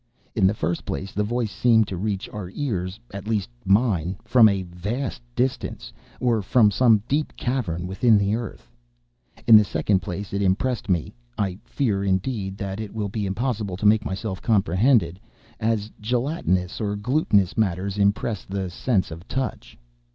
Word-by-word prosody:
In 100 -5 +3
the 100 - +1
first 85 -2 -2
place, 95 +8 -4
the 105 - -1
voice 115 0 -1
seemed 110 -2 +3
to 95 - -3
reach 100 +1 -2
our 100 -4 -6
ears—at 100 -4 -4
least 110 -1 -1 0.2
mine—from 100 +2 +3
a 100 -2 -1
vast 105 +10 -4
distance, 125 - -2 0.3
or 120 -4 +2
from 105 +1 +4
some 110 -1 +4
deep 150 +2 -1
cavern 105 -10 -2
within 105 +4 +3
the 100 0 +1
earth. 115 - -5 0.8
In 115 - +9
the 105 - +6
second 100 -1 +1
place, 95 +4 -6
it 100 - 0
impressed 110 +5 0
me 85 -4 0 0.2
(I 95 -2 -1
fear, 105 -9 0
indeed, 95 0 -1
that 100 0 -4
it 110 -1 -6
will 105 -2 -2
be 105 0 -2
impossible 105 -2 -2
to 105 - -4
make 105 0 +5
myself 95 0 -4
comprehended) 100 -2 +2 0.4
as 110 -1 -1
gelatinous 120 - -1
or 105 -1 -1
glutinous 105 - +1
matters 100 -1 -1
impress 100 +1 +1
the 95 -2 -4
sense 95 -1 0
of 80 +3 -9
touch. 130 -1 -4
105 Hz, 160 wpm, -24 LUFS, 95-115 Hz, 0.8 s, In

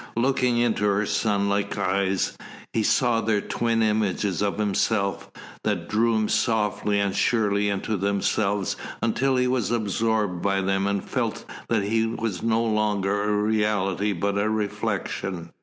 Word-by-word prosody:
Looking 125 -1 +2
into 120 -3 +1
her 105 +1 +2
sunlike 100 -1 0
eyes, 95 -1 0 0.4
he 115 - +1
saw 115 +1 +2
there 110 -2 +1
twin 115 +2 0
images 105 -4 0
of 100 -1 0
himself, 100 -1 0 0.3
that 90 -6 -1
drew 115 +1 +2
him 110 -1 +1
softly 105 -3 +1
and 100 -1 0
surely 105 -3 +2
into 100 +2 -1
themselves 100 0 0 0.3
until 130 +4 +1
he 125 0 +2
was 125 -3 0
absorbed 110 -4 0
by 95 -1 +1
them 95 +1 0
and 100 -1 -2
felt - - -2 0.2
that 115 -3 +2
he 110 +2 +1
was 115 -5 -3
no 115 0 +1
longer 105 -2 0
a 105 0 +1
reality 105 -2 +1
but 100 +2 -1
a 105 +1 +1
reflection. 100 -4 -3
105 Hz, 145 wpm, -25 LUFS, 100-110 Hz, 0.4 s, Looking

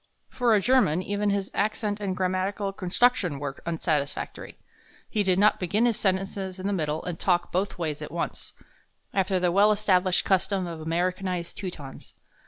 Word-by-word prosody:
For 245 -3 +3
a - - +4
German, 195 -9 +3
even 205 +1 -1
his 200 -1 -1
accent 210 0 -1
and 190 -3 -3
grammatical 190 +2 -1
construction 190 - +1
were 140 -1 -5
unsatisfactory. 155 -3 -2 0.5
He 215 - 0
did 185 -2 +2
not 210 +2 +4
begin 200 +6 +1
his 235 -3 +1
sentences 190 -1 -1
in 185 - -6
the 200 - 0
middle 155 -4 -1
and 175 -2 -4
talk 175 -2 +1
both 190 +3 -1
ways 155 -4 -3
at - - -6
once, - - -4 0.6
after 190 -1 +1
the 180 -1 +2
well 205 +4 +5
established 185 -4 +2
custom 190 0 +1
of 165 -2 -6
Americanized 180 +1 -2
Teutons. 160 -8 -7
185 Hz, 165 wpm, -26 LUFS, 175-205 Hz, 0.6 s, well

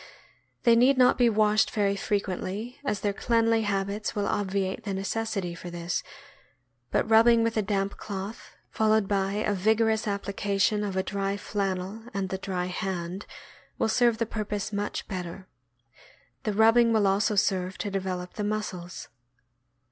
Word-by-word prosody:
They 235 -1 +6
need 255 +3 +5
not 250 -1 +6
be 240 -1 +5
washed 215 -1 +3
very 200 -2 +1
frequently, 200 +3 -3
as 210 -8 -2
their 205 -1 0
cleanly 230 +1 +2
habits 205 0 -2
will 205 -1 0
obviate 195 +1 -1
the 200 -2 -3
necessity 195 -2 -2
for 175 +1 -8
this; 175 0 -3 0.9
but - - +1
rubbing 230 +1 +6
with 230 0 0
a 215 - +2
damp 200 -1 -1
cloth, 200 +1 -7 0.2
followed 220 -2 +2
by 195 -1 0
a 210 0 0
vig 210 +3 +2
orous 220 -1 +1
application 200 +1 0
of 195 -2 -3
a 190 - +1
dry 195 +1 -2
flannel 195 0 -3
and 195 -1 -1
the 190 - -3
dry 185 -2 -2
hand, 180 +1 -4 0.5
will - - +1
serve 235 0 +3
the 230 - 0
purpose 210 -1 -4
much 205 0 -3
better. 185 -1 -6 1.0
The 215 - 0
rubbing 225 +2 +5
will 220 -2 +3
also 200 +2 +2
serve 190 -2 +1
to 205 - -3
develop 185 -2 -3
the 210 - -4
muscles. 200 -4 -4
205 Hz, 155 wpm, -27 LUFS, 190-220 Hz, 1.0 s, They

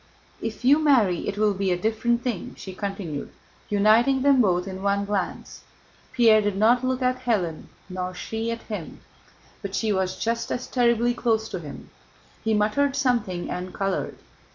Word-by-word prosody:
"If 225 +2 -5
you 285 +4 +6
marry 240 - +3
it 200 - -3
will 210 -1 +3
be 195 -1 -1
a 180 - +1
different 225 +4 0
thing," 240 -8 -4
she 190 - -8
continued, 185 -7 -5 0.4
uniting 225 +6 +4
them 280 -2 +5
both 180 -3 +1
in 190 0 -6
one 200 0 +1
glance. 200 -2 -4 0.5
Pierre 225 -3 +5
did 205 -2 -1
not 235 +4 +4
look 255 0 -1
at 255 0 0
Hélène 180 -9 -1 0.2
nor 185 -1 -5
she 225 +5 -4
at 230 0 -4
him. 205 -8 -7 0.6
But 200 -2 -5
she 215 0 +1
was 190 -1 -1
just 230 0 -2
as 250 - -2
terribly 240 -1 +2
close 225 -2 0
to 185 - -4
him. 150 -4 -10 0.5
He 220 -1 +1
muttered 245 +7 +1
something 235 -10 0
and 180 +1 -5
colored. 195 -1 -2
215 Hz, 170 wpm, -25 LUFS, 190-240 Hz, 0.6 s, you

